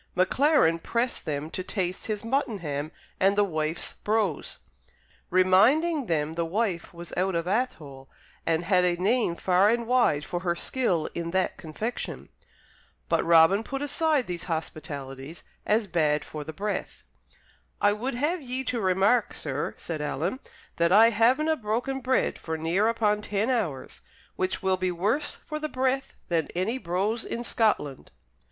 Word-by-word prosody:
Maclaren 185 Hz, -, +3 dB
pressed 235 Hz, +7 st, -1 dB
them 150 Hz, +1 st, -3 dB
to -, -, -2 dB
taste 185 Hz, -2 st, -3 dB
his 215 Hz, -1 st, -3 dB
muttonham 200 Hz, -, -2 dB, 0.3 s
and 195 Hz, +1 st, +4 dB
"the 205 Hz, -, +5 dB
wife's 155 Hz, -3 st, -2 dB
brose," 210 Hz, -7 st, -1 dB, 0.7 s
reminding 240 Hz, -, +4 dB
them 155 Hz, -2 st, 0 dB
the 170 Hz, +1 st, -1 dB
wife 185 Hz, 0 st, -1 dB
was 170 Hz, 0 st, -10 dB
out 185 Hz, 0 st, 0 dB
of 170 Hz, 0 st, -1 dB
Athole 155 Hz, -, -2 dB, 0.3 s
and 165 Hz, 0 st, +1 dB
had 180 Hz, -1 st, +4 dB
a 175 Hz, -1 st, +2 dB
name 200 Hz, 0 st, +1 dB
far 185 Hz, +3 st, +3 dB
and 235 Hz, +1 st, +1 dB
wide 230 Hz, -12 st, +2 dB
for 175 Hz, -, -3 dB
her 175 Hz, -1 st, -1 dB
skill 180 Hz, -6 st, 0 dB
in 170 Hz, -1 st, -3 dB
that 185 Hz, +1 st, 0 dB
confection. 215 Hz, +9 st, -5 dB, 0.8 s
But -, -, +2 dB
Robin 170 Hz, +5 st, +5 dB
put 275 Hz, +4 st, -4 dB
aside 295 Hz, -2 st, +1 dB
these 175 Hz, -2 st, -5 dB
hospitalities 150 Hz, -3 st, -6 dB, 0.2 s
as 215 Hz, +1 st, +3 dB
bad 155 Hz, -5 st, +1 dB
for 150 Hz, -1 st, -6 dB
the 160 Hz, -, -7 dB
breath. 205 Hz, +5 st, -4 dB, 0.8 s
"I 205 Hz, 0 st, +4 dB
would 240 Hz, +5 st, -3 dB
have 305 Hz, +7 st, 0 dB
ye 260 Hz, 0 st, -4 dB
to 245 Hz, -3 st, -2 dB
remark, 195 Hz, +5 st, +2 dB
sir," 145 Hz, -1 st, -3 dB
said 160 Hz, -3 st, -5 dB
Alan, 165 Hz, -, -2 dB, 0.4 s
"that 170 Hz, 0 st, +2 dB
I 225 Hz, +4 st, +7 dB
havenae 260 Hz, +8 st, +2 dB
broken 240 Hz, +6 st, -1 dB
bread 260 Hz, 0 st, 0 dB
for 160 Hz, -1 st, -4 dB
near 170 Hz, +7 st, +1 dB
upon 215 Hz, -2 st, +1 dB
ten 210 Hz, +4 st, 0 dB
hours, 175 Hz, -, -2 dB, 0.3 s
which 185 Hz, +1 st, -2 dB
will 190 Hz, -1 st, +2 dB
be 185 Hz, 0 st, 0 dB
worse 210 Hz, -, -1 dB
for 305 Hz, 0 st, -4 dB
the 305 Hz, 0 st, -3 dB
breath 265 Hz, 0 st, -1 dB
than 165 Hz, -3 st, 0 dB
any 215 Hz, +8 st, -1 dB
brose 200 Hz, +5 st, -1 dB
in 235 Hz, -, -4 dB
Scotland." 210 Hz, -, 0 dB
190 Hz, 155 wpm, -27 LUFS, 165-235 Hz, 0.8 s, I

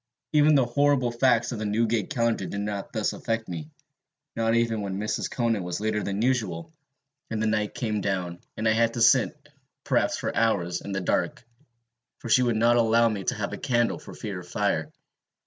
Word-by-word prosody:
Even 150 Hz, 0 st, +5 dB
the 135 Hz, -3 st, +4 dB
horrible 135 Hz, 0 st, +2 dB
facts 120 Hz, -1 st, +2 dB
of 120 Hz, -, -4 dB
the 110 Hz, -, -3 dB
Newgate 110 Hz, +2 st, 0 dB
Calendar 115 Hz, -8 st, 0 dB
did 100 Hz, -, -4 dB
not 100 Hz, -1 st, -4 dB
thus 110 Hz, -3 st, -1 dB
affect 115 Hz, -1 st, -3 dB
me, 80 Hz, -4 st, -6 dB, 0.7 s
not 115 Hz, 0 st, +1 dB
even 115 Hz, -2 st, +1 dB
when 95 Hz, -1 st, -3 dB
Mrs. 105 Hz, +1 st, -2 dB
Conan 115 Hz, -4 st, 0 dB
was 90 Hz, 0 st, -3 dB
later 110 Hz, 0 st, -1 dB
than 100 Hz, +2 st, -2 dB
usual, 115 Hz, -, -1 dB, 0.6 s
and 110 Hz, -, -2 dB
the 110 Hz, -, 0 dB
night 105 Hz, -1 st, 0 dB
came 110 Hz, -3 st, -2 dB
down, 90 Hz, -3 st, -2 dB, 0.2 s
and 110 Hz, -, 0 dB
I -, -, +5 dB
had 115 Hz, +1 st, +2 dB
to 120 Hz, -, -2 dB
sit, 130 Hz, +5 st, +4 dB, 0.5 s
perhaps -, -, +1 dB
for -, -, -3 dB
hours, 90 Hz, -6 st, +1 dB
in 100 Hz, -, -7 dB
the 95 Hz, -1 st, -2 dB
dark, 90 Hz, -, -1 dB, 0.7 s
for 120 Hz, -, -8 dB
she 125 Hz, -, +5 dB
would 120 Hz, -2 st, +1 dB
not 120 Hz, +2 st, +4 dB
allow 115 Hz, 0 st, +4 dB
me 100 Hz, -4 st, -4 dB
to -, -, 0 dB
have -, -, -3 dB
a -, -, -5 dB
candle 120 Hz, -1 st, +1 dB
for -, -, -11 dB
fear 100 Hz, -4 st, -5 dB
of 90 Hz, -, -11 dB
fire. 100 Hz, -5 st, -1 dB
110 Hz, 200 wpm, -26 LUFS, 100-120 Hz, 0.7 s, Even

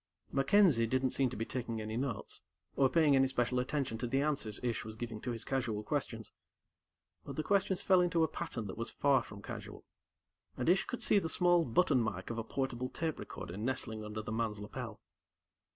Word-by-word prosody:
MacKenzie 135 Hz, -, +4 dB
didn't 130 Hz, +2 st, +1 dB
seem 135 Hz, -2 st, +2 dB
to 120 Hz, -, -7 dB
be 115 Hz, -, -2 dB
taking 120 Hz, -3 st, -3 dB
any 110 Hz, 0 st, -4 dB
notes, 125 Hz, -2 st, -3 dB, 0.3 s
or 135 Hz, -1 st, +4 dB
paying 155 Hz, -3 st, +4 dB
any 135 Hz, 0 st, +5 dB
special 125 Hz, -1 st, 0 dB
attention 125 Hz, -3 st, -1 dB
to 120 Hz, -, -2 dB
the 135 Hz, +3 st, +1 dB
answers 140 Hz, -8 st, +1 dB
Ish 120 Hz, -3 st, -1 dB
was 110 Hz, 0 st, -7 dB
giving 115 Hz, -2 st, -5 dB
to 125 Hz, -, -4 dB
his 115 Hz, -2 st, -4 dB
casual 120 Hz, -6 st, -1 dB
questions. -, -, -3 dB, 0.9 s
But -, -, -7 dB
the 155 Hz, -, -1 dB
questions 195 Hz, -1 st, +1 dB
fell 185 Hz, -2 st, +5 dB
into 170 Hz, -2 st, +2 dB
a -, -, +3 dB
pattern 160 Hz, -12 st, -4 dB
that 100 Hz, +2 st, -7 dB
was 115 Hz, -, -2 dB
far 140 Hz, -3 st, +3 dB
from 100 Hz, -3 st, -11 dB
casual, -, -, -8 dB, 0.7 s
and 125 Hz, -, -2 dB
Ish 180 Hz, +3 st, +4 dB
could 245 Hz, -, -4 dB
see 205 Hz, -, +5 dB
the 165 Hz, -, -3 dB
small 175 Hz, 0 st, +4 dB
button 130 Hz, +1 st, +3 dB
mike 110 Hz, -2 st, -3 dB
of 115 Hz, -, -3 dB
a -, -, -2 dB
portable 130 Hz, 0 st, -2 dB
tape 160 Hz, -2 st, -3 dB
recorder 85 Hz, -, -7 dB
nestling 110 Hz, -1 st, -2 dB
under 105 Hz, 0 st, -5 dB
the 110 Hz, -, -5 dB
man's 110 Hz, -2 st, -1 dB
lapel. 110 Hz, +1 st, -6 dB
125 Hz, 200 wpm, -33 LUFS, 110-145 Hz, 0.9 s, any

